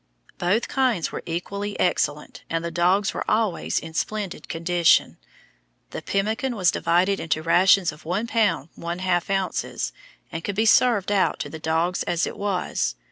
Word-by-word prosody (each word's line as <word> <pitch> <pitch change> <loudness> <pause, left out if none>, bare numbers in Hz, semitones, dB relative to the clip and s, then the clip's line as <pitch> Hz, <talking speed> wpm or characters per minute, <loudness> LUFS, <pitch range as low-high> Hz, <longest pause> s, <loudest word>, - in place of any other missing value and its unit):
Both 185 +7 +1
kinds 250 -10 0
were - - -5
equally 200 +5 -4
excellent, 150 -4 -1
and 165 0 -2
the 170 - -3
dogs 180 +4 +2
were - - -3
always 215 -4 0
in 165 0 -4
splendid 205 +2 -3
condition. 170 0 +2 0.7
The - - -5
pemmican 220 +6 -1
was 185 -4 +3
divided 180 +4 +1
into 155 0 -1
rations 185 +2 +4
of 150 - -15
1 180 +7 -1
pound 205 - +1
1.5 175 +1 -2
ounces, 185 - -2 0.4
and 165 0 -5
could 205 - -3
be 220 +2 +2
served 220 -3 +4
out 200 -2 +2
to - - -5
the 160 - -7
dogs 165 +3 0
as 170 -1 0
it - - -5
was. 180 - -1
180 Hz, 160 wpm, -24 LUFS, 165-205 Hz, 0.7 s, rations